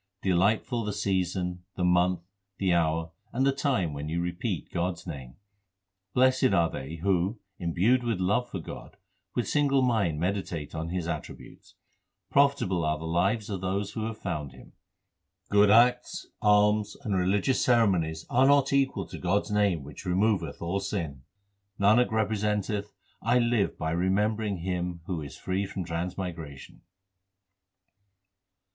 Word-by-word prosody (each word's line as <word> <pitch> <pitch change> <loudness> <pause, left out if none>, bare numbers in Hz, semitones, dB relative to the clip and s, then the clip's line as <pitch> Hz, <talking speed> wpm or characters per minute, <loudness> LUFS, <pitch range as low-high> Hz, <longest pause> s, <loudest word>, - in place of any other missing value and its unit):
Delightful 105 +6 +2
the 105 -1 -3
season, 90 -3 -1
the 90 - -2
month, 90 0 +3 0.4
the 95 -2 +1
hour, 80 -1 +1 0.2
and 130 +3 +1
the 140 - +4
time 130 - 0
when 70 +2 -5
you 85 +2 -1
repeat 85 0 -3
God 90 +2 0
s 85 - -14
name. 70 -7 -8 0.8
Blessed 130 +1 +4
are 85 -3 +3
they 70 +5 -6
who 95 +5 0 0.2
imbued 95 +9 +2
with 115 -5 -1
love 105 +7 +1
for - - -4
God 80 - -9 0.4
with 120 - 0
single 140 -2 +2
mind 100 -11 +1
meditate 90 -4 -2
on 80 0 -4
His 90 -1 -3
attributes. 85 - -7 0.6
Profitable 130 -11 +3
are 75 0 +1
the 80 - -7
lives 95 +7 +1
of 100 -4 -4
those 100 +2 -2
who 110 -1 -3
have 110 -1 -5
found 75 - -4
Him. - - -15 0.8
Good 105 0 +5
acts, 125 +3 +4 0.2
alms, 105 0 +3
and 105 -6 -1
religious 95 +7 +2
ceremonies 90 -10 +2
are 130 +2 +4
not 140 -1 +4
equal 135 -8 +1
to - - -9
God 100 +3 +1
s - - -9
name 100 -7 +2
which 75 +7 -10
removeth 90 -5 0
all 85 +4 -1
sin. 85 -9 -4 0.6
Nanak 110 +5 +4
representeth, 105 -1 -1 0.3
I 120 +2 +3
live 120 -4 +1
by 80 0 -2
remembering 100 +4 0
Him 90 -1 -3
who 85 -4 -3
is 70 -3 -8
free 95 +2 -2
from 95 - -4
transmigration. 85 -4 -5
95 Hz, 150 wpm, -28 LUFS, 85-110 Hz, 0.8 s, Good